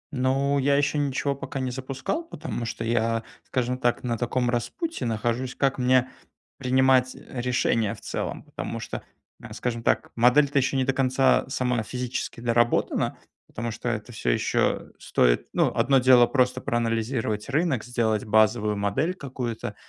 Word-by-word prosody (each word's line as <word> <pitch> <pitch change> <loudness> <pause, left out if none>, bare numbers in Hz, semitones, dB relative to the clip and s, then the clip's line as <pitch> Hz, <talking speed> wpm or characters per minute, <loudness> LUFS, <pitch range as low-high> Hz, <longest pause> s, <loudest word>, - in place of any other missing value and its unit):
Ну, 135 +2 +1
я 140 +1 +3
ещё 145 +1 +1
ничего 140 0 0
пока 135 0 -6
не 130 -1 -2
запускал. 130 - -3
Потому 155 - -5
что 115 0 -4
я, 115 0 0 0.2
скажем 125 0 -1
так, 120 -2 0
на 120 -2 -1
таком 125 +1 0
распутье 320 - -3
нахожусь- 120 +3 -2
как 135 -1 +1
мне 130 0 +3 0.5
принимать, 130 -1 +3
э, 125 - -7
решения 120 -3 +1
в - - -16
целом. - - -4
Потому - - -6
что, - - -6 0.5
скажем 120 -1 -3
так, - - 0
модель 125 +5 +5
то 140 0 +2
ещё 135 +1 0
не 130 - +1
до 135 - +1
конца 130 0 +3
сама 125 -3 0
физически 125 +1 -4
доработана, 120 0 +1 0.3
потому 115 +1 -4
что 120 +2 -4
это 120 0 -4
всё 105 - -3
ещё - - 0
стоит - - +2
Ну, - - +2
одно 135 +1 +4
дело- 125 -1 +6
просто 130 -1 +1
проанализировать 115 -1 -1
рынок, 140 -4 +1
сделать 115 -3 0
базовую 110 -1 +2
модель 100 - 0
какую-то. 125 - -5
125 Hz, 155 wpm, -25 LUFS, 115-135 Hz, 0.5 s, дело